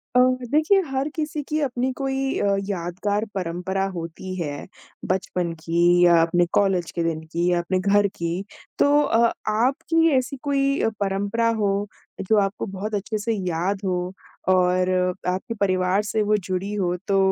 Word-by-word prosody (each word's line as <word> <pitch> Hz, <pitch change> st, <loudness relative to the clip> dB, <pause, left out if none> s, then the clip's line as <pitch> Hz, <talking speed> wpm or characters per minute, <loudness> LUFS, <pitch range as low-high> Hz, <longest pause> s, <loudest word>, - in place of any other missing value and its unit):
अ, -, -, +7 dB, 0.3 s
देखिए 315 Hz, +7 st, +4 dB
हर 270 Hz, +1 st, -1 dB
किसी 305 Hz, -1 st, -2 dB
की 305 Hz, -, 0 dB
अपनी 260 Hz, -2 st, -1 dB
कोई 270 Hz, 0 st, -1 dB
अ, 200 Hz, -1 st, +2 dB
यादगार 200 Hz, +3 st, -2 dB
परंपरा 185 Hz, +1 st, -2 dB
होती 170 Hz, +2 st, -6 dB
है, 145 Hz, -5 st, -4 dB, 0.4 s
बचपन 180 Hz, -2 st, -1 dB
की 165 Hz, +1 st, -1 dB, 0.2 s
या 170 Hz, -1 st, +6 dB
अपने 175 Hz, +1 st, +3 dB
कॉलेज 190 Hz, -4 st, +2 dB
के 170 Hz, -, -2 dB
दिन 165 Hz, -1 st, -1 dB
की 170 Hz, +1 st, +1 dB
या 175 Hz, -, +2 dB
अपने 185 Hz, +2 st, -1 dB
घर 205 Hz, +1 st, +3 dB
की, 170 Hz, 0 st, -3 dB, 0.4 s
तो 290 Hz, +1 st, +5 dB
अ, 235 Hz, -5 st, +3 dB, 0.2 s
आपकी 270 Hz, +9 st, +2 dB
ऐसी 260 Hz, +2 st, -2 dB
कोई 275 Hz, -1 st, +1 dB
अ, -, -, +2 dB
परंपरा 200 Hz, +3 st, 0 dB
हो, 200 Hz, 0 st, 0 dB, 0.3 s
जो 215 Hz, +3 st, +2 dB
आपको 195 Hz, 0 st, -1 dB
बहुत 205 Hz, +2 st, -4 dB
अच्छे 210 Hz, +2 st, -2 dB
से 225 Hz, +2 st, -1 dB
याद 185 Hz, 0 st, -2 dB
हो 180 Hz, -1 st, -1 dB, 0.4 s
और 185 Hz, 0 st, +3 dB, 0.4 s
आपके 185 Hz, +5 st, -2 dB
परिवार 185 Hz, 0 st, +2 dB
से 215 Hz, +1 st, -1 dB
वो 210 Hz, 0 st, +2 dB
जुड़ी 190 Hz, +2 st, -2 dB
हो 180 Hz, -4 st, 0 dB
तो 195 Hz, -, +2 dB
195 Hz, 165 wpm, -23 LUFS, 180-230 Hz, 0.4 s, अ